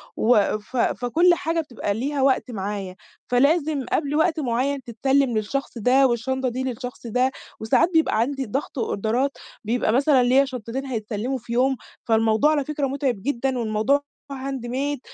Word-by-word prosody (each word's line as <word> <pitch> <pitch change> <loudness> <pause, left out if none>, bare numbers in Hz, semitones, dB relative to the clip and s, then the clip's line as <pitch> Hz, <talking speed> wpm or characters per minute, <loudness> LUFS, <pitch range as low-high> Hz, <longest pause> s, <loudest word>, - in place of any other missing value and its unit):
وف 215 +1 +1
فكُلّ 315 +9 +3
حاجة 330 0 -1
بتبقى 240 -8 -3
ليها 275 +6 -2
وقت 265 -1 +2
معايا، 195 -3 -4 0.3
فلازم 285 +2 +2
قبل 290 -1 0
وقت 320 +1 +2
معيّن 270 +1 -1
تتسلّم 260 +1 +1
للشخص 240 +5 -3
ده 255 +4 +4
والشنطة 260 +2 -1
دي 255 +2 -3
للشخص 250 -1 -6
ده، 250 +3 +1 0.3
وساعات 220 +9 +3
بيبقى 320 -8 +3
عندي 270 +3 -1
ضغط 265 +4 -4
أوردرات 235 +5 -1 0.3
بيبقى 225 0 0
مثلًا 270 0 +4
ليّا 260 +3 +4
شنطتين 255 0 -5
هيتسلموا 235 +1 -3
في 235 -1 -7
يوم، 260 +3 +2 0.3
فالموضوع 225 +5 +3
على 290 -3 0
فكرة 295 -1 -1
مُتعِب 265 -6 -2
جدًا 265 +1 -1
والموضوع 225 +5 +1 0.3
handmade 270 +1 -3
260 Hz, 145 wpm, -23 LUFS, 230-275 Hz, 0.3 s, ده